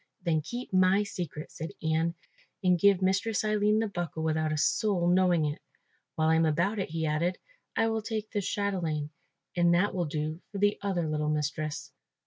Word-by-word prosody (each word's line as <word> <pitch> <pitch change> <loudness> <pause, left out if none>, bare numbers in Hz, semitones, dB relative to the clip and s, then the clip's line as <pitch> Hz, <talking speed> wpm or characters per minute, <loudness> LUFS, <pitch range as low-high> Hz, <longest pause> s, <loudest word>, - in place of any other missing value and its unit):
"Then 160 -3 +1
keep 240 - -6
my 185 +2 +4
secret," 175 -7 -6
said 160 +1 -6
Ian, 160 +1 +1 0.5
"and 180 -1 +4
give 195 0 +4
Mistress 195 +4 +1
Aline 210 0 +2
the 225 0 +1
buckle 175 -5 -4
without 155 -1 0
a 155 - -1
soul 180 +2 +2
knowing 175 -3 +4
it. 150 0 -3 0.5
While 160 0 +2
I 160 - +4
am 165 - +3
about 175 +8 +1
it," 190 - -2
he 160 0 -2
added, 160 +4 0 0.4
"I 225 - +3
will 225 0 0
take 215 -1 -4
this 205 -2 -1
chatelaine, 170 -7 -1 0.4
and 175 -1 +4
that 195 +4 +2
will 180 -2 0
do 155 +2 -3
for 200 - -5
the 205 +1 +2
other 185 -5 -1
little 150 0 -1
mistress." 150 0 -2
175 Hz, 185 wpm, -29 LUFS, 155-200 Hz, 0.5 s, my